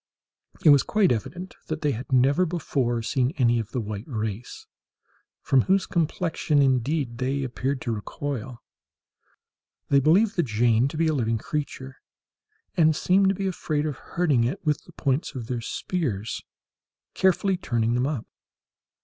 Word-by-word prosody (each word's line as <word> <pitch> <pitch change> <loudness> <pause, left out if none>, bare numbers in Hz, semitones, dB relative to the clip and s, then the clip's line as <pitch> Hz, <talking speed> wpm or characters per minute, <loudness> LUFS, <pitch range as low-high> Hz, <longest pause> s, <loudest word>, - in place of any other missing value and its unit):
It 155 - +9
was 140 -2 +7
quite 210 -4 +2
evident 175 - -4
that 155 0 -4
they 150 - +1
had 125 +2 -6
never 135 +7 +4
before 130 -8 -1
seen 130 +3 0
any 120 -3 +3
of 110 -2 -4
the 125 - -3
white 105 -1 -5
race—from 115 +3 -4
whose 190 +8 +2
complexion, 165 -2 0
indeed, 130 -1 +1
they 135 +2 -1
appeared 130 +1 -2
to 120 - -2
recoil. 120 +2 -5 1.3
They 140 - +5
believed 190 - +3
the - - +5
Jane 120 -2 +2
to 145 - -6
be 165 - +2
a 160 - +2
living 115 -5 0
creature, 135 +1 -5 0.8
and 160 -4 +4
seemed 190 +4 +3
to 195 - +1
be 195 - -3
afraid 155 -5 -1
of 150 -3 -3
hurting 150 -9 +1
it 125 +7 -3
with 150 -2 0
the - - -15
points 140 0 -1
of 125 -3 -5
their 120 0 -3
spears, 115 - -3 0.7
carefully 190 +1 +2
turning 120 -9 -1
them 125 +2 +1
up. 140 -7 -3
135 Hz, 155 wpm, -25 LUFS, 120-160 Hz, 1.3 s, It